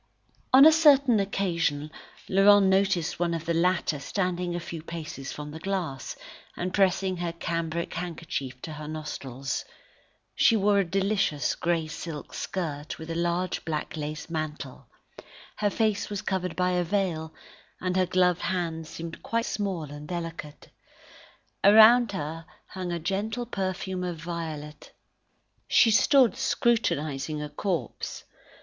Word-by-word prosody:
On 270 +2 +9
a 315 - +10
certain 280 -7 +5
occasion 170 -7 -1 0.4
Laurent 200 +1 +6
noticed 190 -4 +2
one 170 -1 +1
of 165 -1 -5
the 170 - 0
latter 170 -3 +1
standing 180 +2 -2
at - - -1
a 170 - -10
few 165 -2 -6
paces 155 -5 -7
from 150 0 -7
the 160 - -8
glass, 175 -8 -3 0.4
and 180 +1 -3
pressing 190 -1 +2
her 170 -1 -2
cambric 170 0 -3
handkerchief 160 -7 -5
to 155 - -5
her 150 0 -7
nostrils. 140 -4 -4 0.7
She 230 - +4
wore 200 0 +3
a - - +4
delicious 195 -4 0
grey 170 -1 0
silk 155 -1 -7
skirt 155 -5 -4
with 160 +1 -7
a - - -3
large 175 +1 -1
black 160 +3 -3
lace 155 0 -5
mantle; 150 -5 -5 0.7
her 205 - +1
face 215 -1 0
was 205 -1 -4
covered 185 -2 -2
by 180 0 +1
a 180 -1 +1
veil, 170 -4 -1 0.5
and 185 0 -2
her 185 -1 +2
gloved 180 -1 +2
hands 165 -3 -2
seemed 165 0 -7
quite 230 0 -1
small 195 -6 -2
and 145 0 -9
delicate. 165 -4 -6 0.9
Around 220 +2 +7
her 165 0 -5 0.2
hung 185 -2 -5
a 170 - -1
gentle 205 +8 -2
perfume 190 -3 -3
of 175 -2 -3
violet. 160 -3 -6 0.7
She 230 - +5
stood 260 +2 +5
scrutinising 155 - 0
a 150 0 -5
corpse. 155 - -3
175 Hz, 145 wpm, -27 LUFS, 155-195 Hz, 0.9 s, a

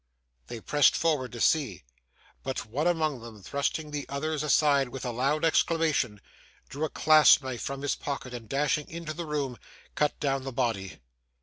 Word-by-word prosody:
They 115 - -6
pressed 145 +4 +3
forward 150 -6 0
to 120 - -7
see; 125 - +1 0.6
but 130 -3 -4
one 140 +10 -1
among 155 -6 0
them 110 -3 -11
thrusting 145 - -2
the 145 -1 -5
others 150 +2 -2
aside 145 -3 +3
with 130 +1 -7
a 125 - -1
loud 140 +7 0
exclamation, 160 -9 +1 0.5
drew 145 +3 -2
a - - -4
clasp 155 -2 +6
knife 130 -3 -5
from 140 0 -5
his 145 - +1
pocket, 135 -3 -5
and 115 -3 -8
dashing 145 +1 0
into 165 -1 -6
the 170 0 -6
room, 140 -5 -3 0.3
cut 150 -1 0
down 135 -2 0
the 135 - -5
body. 115 -7 -2
140 Hz, 175 wpm, -28 LUFS, 125-155 Hz, 0.6 s, clasp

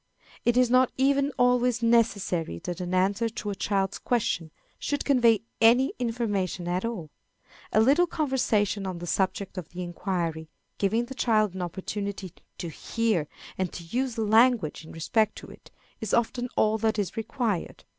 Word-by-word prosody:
It 240 0 +3
is 250 -1 +4
not 255 0 +4
even 280 +1 +2
always 245 -1 +2
necessary 200 - +1
that 180 +1 -4
an 180 0 -4
answer 200 +5 +2
to 215 -2 -5
a - - -4
child's 195 0 -1
question 210 -9 -1 0.3
should 285 -1 -2
convey 235 -6 +4 0.2
any 245 +4 +5
information 205 -7 -2
at 180 +1 -1
all. 215 -10 -4 0.6
A - - +3
little 285 +10 +4
conversation 220 - 0
on 185 -2 -4
the 175 - -6
subject 190 +1 -1
of 165 - -9
the 180 0 -6
inquiry, 170 -3 -3 0.3
giving 220 +4 +1
the 265 - -8
child 215 -6 +2
an 190 - -5
opportunity 190 +1 -4 0.2
to 180 - -5
hear 210 -1 -1 0.3
and 185 -2 -1
to 170 - -7
use 255 -2 -1
language 220 -6 +3
in 160 - -12
respect 215 +6 0
to - - -10
it, - - -16 0.3
is 220 -3 0
often 245 +1 0
all 220 0 +3
that 220 0 +1
is 195 -3 -2
required. 225 -4 -2
215 Hz, 165 wpm, -27 LUFS, 185-240 Hz, 0.6 s, any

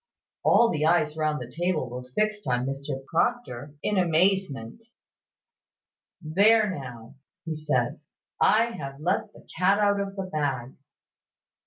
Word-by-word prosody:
All 235 - +5
the 150 -1 -1
eyes 155 -2 +2
round 155 -2 0
the 125 -1 -8
table 170 -5 0
were 125 +1 -6
fixed 215 -1 0
on 125 0 +1
Mr 135 0 -5
Proctor 150 - -1
in 205 -2 +1
an 170 -3 +1
instant. 185 - 0 1.4
"There 205 +6 +4
now!" 125 -5 -9 0.4
said 150 -6 0
he, - - -15 0.5
"I 220 +2 +5
have 140 -9 -7
let 190 +7 -1
the - - -18
cat 190 +2 +4
out 205 -1 +2
of 200 0 -4
the 195 - -3
bag. 140 -7 -2
155 Hz, 140 wpm, -26 LUFS, 135-200 Hz, 1.4 s, All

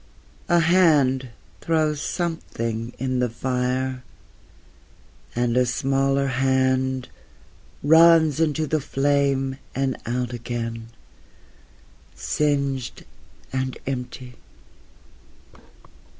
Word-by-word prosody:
A 175 -1 +4
hand 150 -7 +3 0.3
throws 155 -2 0
something 115 -11 -3
in 130 0 -1
the 125 -1 +1
fire 130 +2 -2 1.3
and 120 0 0
a 125 - +4
smaller 135 +2 +1
hand 130 0 +1 0.8
runs 160 -1 +6
into 155 -1 +1
the 155 0 0
flame 135 -1 0 0.2
and 135 -1 0
out 125 0 -2
again, 115 -1 -5 1.3
singed 140 -4 -1 0.5
and 130 0 -2
empty.... 125 -1 -6
130 Hz, 80 wpm, -23 LUFS, 125-145 Hz, 1.3 s, runs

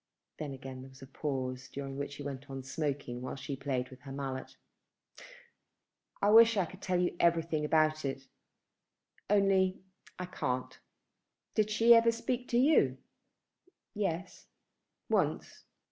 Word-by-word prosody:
Then 150 -2 -4
again 130 -1 -8
there 130 - -11
was 130 0 -15
a - - -7
pause, 130 -2 -4
during 135 -1 -5
which 140 0 -4
he 145 - -7
went 140 0 -6
on 135 -1 -6
smoking 135 -3 -3
while 130 - -5
she 135 +1 -5
played 130 -2 -2
with 130 - -12
her 135 - -9
mallet. 135 -1 -5 1.7
"I 205 - +5
wish 230 0 +8
I 190 - +3
could 190 +3 -12
tell 180 -2 0
you 180 -1 0
everything 165 -2 +2
about 155 0 +2
it; 135 -1 -4 1.0
only 195 -2 +3 0.3
I 180 - -4
can't. 130 -8 -3 0.8
Did 215 -1 +2
she 225 +2 +6
ever 230 0 +6
speak 245 +2 -3
to 235 - +1
you?" 280 +6 +4 1.0
"Yes, 190 -3 -3 0.6
once." - - -1
150 Hz, 145 wpm, -32 LUFS, 135-190 Hz, 1.7 s, wish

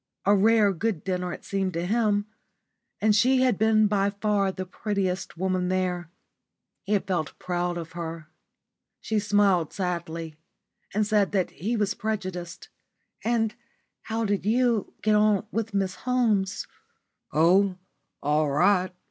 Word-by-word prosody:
A 200 - +5
rare 210 0 +4
good 195 -2 -2
dinner, 180 -1 -2
it - - -8
seemed 190 -2 -1
to 170 +1 -2
him. 210 0 +1 0.8
And 215 -1 +4
she 255 +5 +4
had 245 -6 +2
been 220 0 +4
by 200 -1 +2
far 200 -1 0
the 185 0 -5
prettiest 190 -2 -3
woman 185 0 0
there. 180 -2 -1 0.7
He 205 - -2
had 205 - +1
felt 180 -6 -2
proud 175 -1 -2
of 165 0 -6
her. 165 -2 -6 0.7
She 220 -1 -1
smiled 200 -5 +2
sadly, 170 -4 -4 0.5
and 210 +1 +1
said 210 -2 +2
that 190 -3 +1
he 225 +7 -2
was 205 -1 +1
prejudiced. 185 -6 -5 0.5
"And 225 -2 +1 0.5
how 225 0 -2
did 205 -2 0
you 230 0 +1
get 215 - +3
on 210 -1 +3
with 225 0 -2
Miss 195 -2 0
Holmes?" 220 -6 0 0.7
"Oh, 185 +4 +4 0.5
all 150 +1 +2
right. 185 +6 +3
195 Hz, 140 wpm, -26 LUFS, 180-215 Hz, 0.8 s, A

